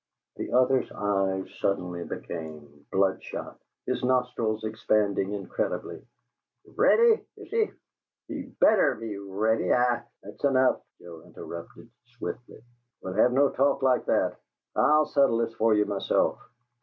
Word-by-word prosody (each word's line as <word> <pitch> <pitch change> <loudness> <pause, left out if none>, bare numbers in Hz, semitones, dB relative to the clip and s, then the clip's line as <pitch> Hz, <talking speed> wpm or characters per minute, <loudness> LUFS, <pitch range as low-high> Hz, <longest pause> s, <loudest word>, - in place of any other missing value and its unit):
The - - -5
other's 130 +1 +3
eyes 95 -2 0
suddenly 90 -3 -1
became 75 -4 -8
bloodshot, 95 0 -1 0.3
his - - -2
nostrils 125 -4 0
expanding 105 -2 0
incredibly. 100 -1 -4 0.6
"READY, 460 -1 +4
is - - -12
he? 450 -1 +1 0.6
He - - -5 0.2
BETTER 210 - +5
be 110 -2 -6
ready. 105 +3 0
I 120 -1 +3
" - - -47
"That's - - -12
enough!" 130 -2 +3 0.2
Joe 85 -2 -11
interrupted, 85 +9 -10 0.3
swiftly. 120 -1 -7 0.4
"We'll 95 - -4
have 110 +5 +4
no 140 +2 +3
talk 135 0 +1
like 130 -1 +3
that. - - +1 0.4
I'll 150 0 +4
settle 140 -6 +3
this 115 -1 -1
for 110 -1 +3
you, 105 0 +3
myself. 100 -1 0
110 Hz, 130 wpm, -27 LUFS, 95-130 Hz, 0.6 s, BETTER